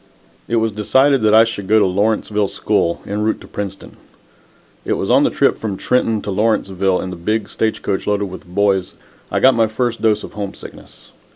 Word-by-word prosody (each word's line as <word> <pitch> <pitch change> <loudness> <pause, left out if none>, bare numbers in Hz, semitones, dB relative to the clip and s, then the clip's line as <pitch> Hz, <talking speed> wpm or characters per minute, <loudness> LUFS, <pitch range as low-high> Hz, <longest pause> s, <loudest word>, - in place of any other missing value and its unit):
It 115 - -1
was 115 -1 +1
decided 130 +6 +2
that 110 0 +4
I 110 - +8
should 105 -4 -4
go 110 +2 +4
to 110 - +4
Lawrenceville 105 +2 0
School, 85 -3 -1
en 105 +1 -3
route 110 +1 0
to - - -12
Princeton. 100 -2 -7 0.9
It - - -1
was - - -2
on - - +5
the - - +3
trip - - +1
from 105 -4 -4
Trenton 115 -2 0
to 100 - -4
Lawrenceville, 95 -2 0
in 95 - -5
the - - -6
big 105 +5 -2
stage 110 -1 -2
coach 95 - -2
loaded 105 0 +1
with 95 0 -9
boys, 95 0 0 0.3
I - - 0
got 130 0 +5
my 115 -2 +2
first 120 +1 -2
dose 110 -2 +2
of - - -9
homesickness. 100 -2 -9
105 Hz, 200 wpm, -18 LUFS, 100-110 Hz, 0.9 s, I